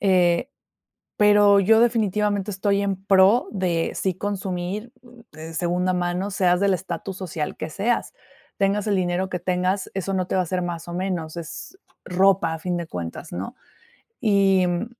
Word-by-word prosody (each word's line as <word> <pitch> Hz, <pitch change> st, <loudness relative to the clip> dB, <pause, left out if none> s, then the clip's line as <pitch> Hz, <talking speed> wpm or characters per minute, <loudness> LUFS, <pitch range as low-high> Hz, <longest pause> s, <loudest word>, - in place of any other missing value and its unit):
Eh, 180 Hz, +4 st, +2 dB, 0.7 s
pero 205 Hz, -1 st, +6 dB
yo 220 Hz, +3 st, +5 dB
definitivamente 210 Hz, -3 st, +1 dB
estoy 200 Hz, +1 st, 0 dB
en 195 Hz, -1 st, -1 dB
pro 195 Hz, +5 st, +5 dB
de 180 Hz, -4 st, -1 dB
sí 190 Hz, -2 st, -1 dB
consumir, 195 Hz, +2 st, -4 dB, 0.4 s
de 160 Hz, +1 st, -9 dB
segunda 180 Hz, +2 st, 0 dB
mano, 180 Hz, +2 st, -1 dB
seas 180 Hz, -2 st, +2 dB
del 200 Hz, -1 st, +3 dB
estatus 185 Hz, +1 st, -5 dB
social 165 Hz, -5 st, -4 dB
que 155 Hz, -, -5 dB
seas. 220 Hz, +8 st, -1 dB, 0.4 s
Tengas 200 Hz, +1 st, +1 dB
el 205 Hz, -, +2 dB
dinero 185 Hz, 0 st, 0 dB
que 180 Hz, -, -3 dB
tengas, 185 Hz, +2 st, -1 dB
eso 195 Hz, 0 st, -2 dB
no 185 Hz, -1 st, 0 dB
te -, -, -2 dB
va 185 Hz, -, +3 dB
a -, -, 0 dB
hacer 180 Hz, +1 st, -2 dB
más 175 Hz, -1 st, -5 dB
o 175 Hz, -, -6 dB
menos, 175 Hz, -3 st, -3 dB
es 170 Hz, -, -8 dB, 0.3 s
ropa, 185 Hz, -2 st, +3 dB
a 160 Hz, -, -6 dB
fin 175 Hz, +1 st, -2 dB
de 170 Hz, -1 st, -5 dB
cuentas, 85 Hz, -2 st, -6 dB
¿no? 95 Hz, +3 st, -5 dB, 0.7 s
Y, 195 Hz, -4 st, +3 dB
mm 175 Hz, +5 st, -1 dB
185 Hz, 170 wpm, -23 LUFS, 175-200 Hz, 0.7 s, pero